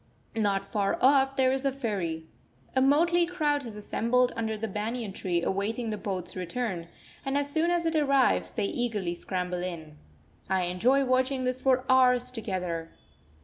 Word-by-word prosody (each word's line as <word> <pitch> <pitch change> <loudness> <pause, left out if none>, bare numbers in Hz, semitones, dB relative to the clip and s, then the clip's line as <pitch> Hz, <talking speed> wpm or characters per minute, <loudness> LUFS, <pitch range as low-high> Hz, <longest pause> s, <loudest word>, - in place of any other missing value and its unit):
Not 200 -3 +1
far 195 0 0
off 270 0 +4
there 260 -1 +3
is 265 0 -1
a 275 - +2
ferry. 195 -11 -3 0.5
A 260 - +4
motley 340 +6 +4
crowd 300 -5 0
has 230 -5 -8
assembled 235 +4 +1
under 220 -1 -2
the 225 +1 -3
banyan 215 +1 -3
tree 175 -3 -1
awaiting 220 +4 -1
the - - -1
boat's 185 -3 -4
return; 185 -1 -3 0.4
and 270 +1 -1
as 285 0 -1
soon 320 +3 +1
as 345 -1 +1
it 325 0 0
arrives, 275 -4 +3
they 210 - -1
eagerly 210 -6 -2
scramble 180 0 -3
in. 160 -4 -6 0.5
I 190 -1 +2
enjoy 240 +11 +2
watching 255 +1 +1
this 255 0 -1
for 260 -1 +2
hours 250 -1 +4
together. 180 -8 -3
230 Hz, 165 wpm, -28 LUFS, 190-265 Hz, 0.5 s, off